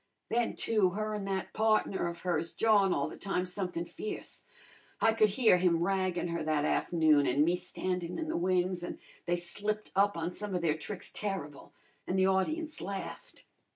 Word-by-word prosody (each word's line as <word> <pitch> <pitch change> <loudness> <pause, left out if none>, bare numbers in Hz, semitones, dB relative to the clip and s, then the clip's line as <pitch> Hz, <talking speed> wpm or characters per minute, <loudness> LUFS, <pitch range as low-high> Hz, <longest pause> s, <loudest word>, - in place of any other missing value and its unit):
Then, 235 0 +1
too, 215 -5 +2
her 215 0 -1
an' 205 -2 -3
that 195 -1 -3
partner 215 -4 +2
of 170 0 -6
hers 170 -2 -1
jawin' 205 -4 +4
all 140 - +1
the - - -8
time 195 -2 -2
somethin' 180 -2 -3
fierce. 180 +5 -7 0.6
I 225 - +4
could 215 -1 +4
hear 220 -2 +4
him 175 -2 +2
raggin' 185 -2 0
her 170 0 -2
that 155 -1 +1
af'noon, 155 -5 +3
an' 140 +4 +3
me 175 +2 +3
standin' 180 -1 -3
in 320 - -3
the 315 - -2
wings, 180 0 +1
an' - - -5 0.3
they 175 - +2
slipped 205 +5 -3
up 200 -1 +3
on 165 +1 -2
some 205 +1 -4
of 175 - -1
their 160 -3 +3
tricks 185 +4 -6
terrible, 190 -9 -5 0.4
an' 185 - -1
the 190 0 +4
audience 305 - 0
laughed. 200 - -7
185 Hz, 185 wpm, -31 LUFS, 170-210 Hz, 0.6 s, jawin